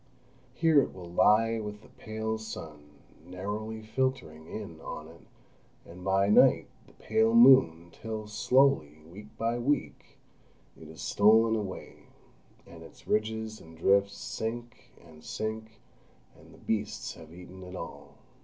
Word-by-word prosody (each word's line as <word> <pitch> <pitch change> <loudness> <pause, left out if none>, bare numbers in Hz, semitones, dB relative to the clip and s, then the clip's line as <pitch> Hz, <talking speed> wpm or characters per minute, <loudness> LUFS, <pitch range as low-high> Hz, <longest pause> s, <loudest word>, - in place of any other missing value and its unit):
Here 155 +2 +4
it - - -5
will 90 -2 -10
lie 115 +5 +3
with 105 0 -7
the - - -16
pale 110 0 -5
sun 75 -9 -9 0.3
narrowly 105 +5 -6
filtering 110 -10 -3
in 85 -5 -8
on 75 -1 -7
it, 85 +1 -15 0.6
and 90 +2 -12
by 95 +1 +2
night 105 - +5 0.2
the - - -20
pale 110 +1 +1
moon, 115 -10 +6
till 110 -1 -6
slowly, 105 - +2
week 100 +5 -12
by 115 +1 -1
week, 140 +3 -2 0.6
it 80 - -13
is 80 +1 -10
stolen 110 +2 +4
away, 100 -4 -7 0.6
and - - -13
its - - -15
ridges 110 0 -2
and 80 0 -15
drifts 100 +3 +2
sink 120 +3 -6 0.2
and 80 -2 -16
sink, 110 0 -5 0.6
and - - -18
the - - -16
beasts 110 0 -3
have 80 -1 -14
eaten 90 +2 -12
it 90 0 -9
all.... 85 -2 -9
105 Hz, 140 wpm, -29 LUFS, 90-110 Hz, 0.6 s, moon